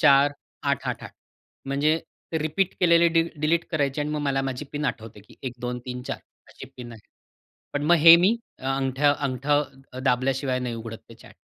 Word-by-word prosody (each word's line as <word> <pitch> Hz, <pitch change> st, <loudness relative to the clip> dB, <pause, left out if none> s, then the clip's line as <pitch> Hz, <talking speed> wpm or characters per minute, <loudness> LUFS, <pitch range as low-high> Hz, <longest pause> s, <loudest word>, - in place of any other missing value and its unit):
4-8-8-8. 140 Hz, +1 st, +1 dB, 0.5 s
म्हणजे 145 Hz, +4 st, +2 dB, 0.4 s
रिपीट 175 Hz, +5 st, 0 dB
केलेले 170 Hz, -1 st, +5 dB
dill 165 Hz, 0 st, +2 dB
delete 165 Hz, +2 st, +2 dB
करायचे 145 Hz, -3 st, 0 dB
आणि 150 Hz, +1 st, -2 dB
मग 150 Hz, 0 st, -2 dB
मला 135 Hz, -2 st, 0 dB
माझी 135 Hz, +2 st, -4 dB
पिन 150 Hz, 0 st, -3 dB
आठवते 110 Hz, -5 st, -4 dB
की -, -, -17 dB
1-2-3-4 125 Hz, 0 st, -5 dB, 0.3 s
अशी -, -, -11 dB
पिन 120 Hz, -2 st, -8 dB
आहे. 115 Hz, -, -12 dB, 0.7 s
पण 145 Hz, 0 st, -1 dB
मग 175 Hz, +3 st, +5 dB
हे 165 Hz, +1 st, +10 dB
मी 190 Hz, +6 st, +4 dB, 0.4 s
अंगठं 135 Hz, +2 st, +2 dB
अंगठं 140 Hz, 0 st, -1 dB, 0.2 s
दाबल्याशिवाय 130 Hz, 0 st, +1 dB
नाही 125 Hz, -2 st, -3 dB
उघडत 115 Hz, 0 st, -7 dB
ते -, -, -11 dB
चॅट. -, -, -16 dB
140 Hz, 150 wpm, -25 LUFS, 125-150 Hz, 0.7 s, हे